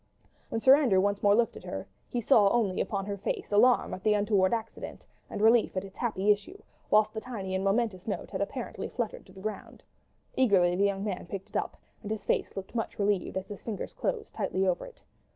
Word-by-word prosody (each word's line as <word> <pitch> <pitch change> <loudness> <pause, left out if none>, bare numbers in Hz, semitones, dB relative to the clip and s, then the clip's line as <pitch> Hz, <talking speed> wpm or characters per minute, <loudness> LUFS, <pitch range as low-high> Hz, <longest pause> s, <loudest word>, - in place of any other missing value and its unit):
When 225 - -1
Sir 265 +2 +8
Andrew 250 -11 +3
once 200 +1 +1
more 205 0 +5
looked 235 +1 +2
at - - -10
her, - - -5 0.2
he - - -3
only 205 -3 +4
saw 200 - -3
on 195 - -3
her 200 0 -4
face 205 - -3
alarm 240 +5 +4
at 185 - -6
the 210 0 +3
untoward 205 -2 +2
accident 225 -1 -5 0.2
and - - -4
relief 225 -3 +4
at 185 - -1
its 195 - -13
happy 210 -4 +1
issue; 320 - -2 0.3
whilst 215 0 +4
the 220 - -4
tiny 200 -7 -5
and 190 0 0
momentous 195 -2 0
note 210 - -4
had - - -3
apparently - - -4
fluttered - - -4
to - - -16
the 190 - -12
ground. 215 +2 -6 0.5
Eagerly 190 -8 +4
the 200 +2 +3
young 200 -1 0
man 195 -4 -4
picked 195 +3 -7
it - - -18
up, - - -2 0.2
and 210 - -7
his 215 -2 -4
face - - -1
looked 195 +1 -6
much 225 -2 -3
relieved, 200 -2 0
as 190 - -3
his 205 - -8
fingers 215 -4 -5
closed 460 -3 -3
tightly 190 +1 -1
over 180 - 0
it. - - -16
205 Hz, 225 wpm, -29 LUFS, 195-225 Hz, 0.5 s, Sir